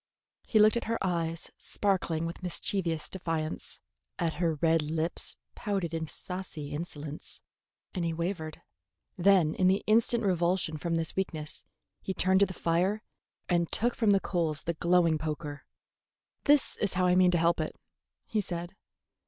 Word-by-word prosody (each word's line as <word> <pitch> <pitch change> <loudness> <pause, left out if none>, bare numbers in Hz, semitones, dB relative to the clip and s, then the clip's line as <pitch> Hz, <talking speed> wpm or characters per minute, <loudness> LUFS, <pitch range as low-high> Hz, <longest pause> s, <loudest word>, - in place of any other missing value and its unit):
He 220 - +2
looked 215 +2 +6
at - - -2
her 230 +1 0
eyes 170 -2 -1
sparkling 175 -5 0
with 170 +3 -5
mischievous 175 -2 -1
defiance, 165 -4 -3 0.4
at 170 -4 0
her 165 -2 +2
red 165 +1 +3
lips 160 +2 -2 0.2
pouted 195 -6 -2
in 160 -1 -2
saucy 180 -4 -2
insolence, 150 -1 -6 0.5
and 180 - -2
he 165 - 0
wavered. 165 -1 -4 0.5
Then 180 -4 +4
in 185 - +2
the 190 +2 +3
instant 230 +2 +3
revulsion 175 -3 +1
from 165 +2 -1
this 165 -1 -1
weakness 160 -5 -3 0.4
he 190 - -3
turned 190 +1 +3
to 200 - +5
the 185 - -6
fire 185 +6 +1 0.4
and 170 -2 +1
took 240 +2 +1
from 225 -3 +1
the 200 -1 +5
coals 165 -6 -1
the 170 - -1
glowing 170 -1 +3
poker. 150 -2 -4 0.8
"That 290 -1 +4
is 200 -3 0
how 185 0 +2
I 180 0 +4
mean 185 0 +6
to 175 - +3
help 170 +1 +3
it," 155 - -4 0.5
he 215 - 0
said. 175 -2 -5
175 Hz, 160 wpm, -30 LUFS, 160-190 Hz, 0.8 s, looked